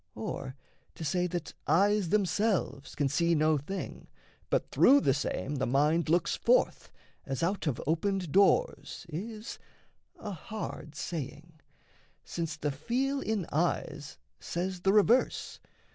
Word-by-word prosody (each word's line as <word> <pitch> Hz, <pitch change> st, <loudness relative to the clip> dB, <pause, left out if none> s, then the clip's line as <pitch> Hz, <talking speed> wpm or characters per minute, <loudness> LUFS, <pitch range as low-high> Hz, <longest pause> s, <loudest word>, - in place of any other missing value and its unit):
Or, 130 Hz, +4 st, -5 dB, 0.4 s
to 160 Hz, -, -6 dB
say 180 Hz, +4 st, +1 dB
that 175 Hz, -3 st, -4 dB
eyes 195 Hz, +3 st, +3 dB
Themselves 195 Hz, -, 0 dB
can 145 Hz, -, +1 dB
see 170 Hz, +4 st, +2 dB
no 155 Hz, -1 st, +3 dB
thing, 190 Hz, +8 st, -6 dB, 0.4 s
but -, -, 0 dB
through 280 Hz, +1 st, +6 dB
the 135 Hz, -, +3 dB
same 145 Hz, +1 st, -2 dB
The 130 Hz, -, 0 dB
mind 150 Hz, +6 st, +2 dB
looks 170 Hz, +1 st, +2 dB
forth, -, -, +2 dB, 0.3 s
as 135 Hz, +3 st, -3 dB
out 185 Hz, 0 st, 0 dB
of 140 Hz, -, -1 dB
opened 180 Hz, +2 st, 0 dB
doors, 200 Hz, -, +2 dB
Is 215 Hz, +7 st, -6 dB, 0.6 s
a 210 Hz, -, -6 dB
hard 170 Hz, -4 st, -7 dB
saying; 155 Hz, +1 st, -6 dB, 0.6 s
since 165 Hz, -2 st, -4 dB
the 150 Hz, -, -1 dB
feel 255 Hz, -, -1 dB
in 215 Hz, -8 st, -1 dB
eyes 150 Hz, -2 st, -1 dB, 0.2 s
Says 180 Hz, +1 st, -3 dB
the 195 Hz, -, +3 dB
reverse. 215 Hz, +5 st, +3 dB
170 Hz, 130 wpm, -30 LUFS, 150-200 Hz, 0.6 s, through